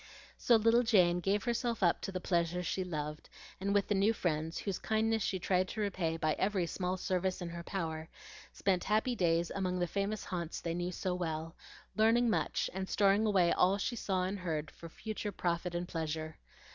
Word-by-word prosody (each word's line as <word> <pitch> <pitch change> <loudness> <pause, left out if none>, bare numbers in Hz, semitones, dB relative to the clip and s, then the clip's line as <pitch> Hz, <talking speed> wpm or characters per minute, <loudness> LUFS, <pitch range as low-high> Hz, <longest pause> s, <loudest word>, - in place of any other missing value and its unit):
So 240 - +4
little 230 +2 +5
Jane 180 -7 +4
gave 195 +3 0
herself 235 -2 -1
up 170 - +3
to - - -4
the 185 - -3
pleasures 175 0 0
she 190 - -1
loved, 150 -3 -5 0.3
and 195 +1 -1
with 200 -1 +2
the - - +1
new 200 +3 +3
friends, 160 -5 -1
whose 195 -3 -3
kindness 220 0 +1
she 190 - 0
tried 185 0 +1
to 215 - -6
repay 180 -6 -1
by 155 -1 +1
every 190 -2 +1
small 180 +2 -2
service 185 0 -1
in 175 -2 -4
her 170 0 -6
power, 160 -3 -4 0.4
spent 185 -2 0
happy 220 +4 +1
days 170 -3 +1
among 185 -2 -1
the 175 - +1
famous 200 +4 -2
haunts 170 -3 -4
they 170 - -3
knew 175 +1 -2
so 180 +1 -2
well, 165 -2 -3 0.4
learning 225 +2 +4
much 160 -5 0
and 190 0 -4
storing 205 +2 +3
away 185 -5 +4
all 190 +2 +3
she 240 +4 -2
saw 190 -4 -1
and 195 +2 -2
heard 160 -4 -3
for 165 - -11
future 210 +3 -5
profit 175 -1 -2
and 175 +1 -2
pleasure. 160 -2 -4
185 Hz, 195 wpm, -33 LUFS, 170-205 Hz, 0.4 s, little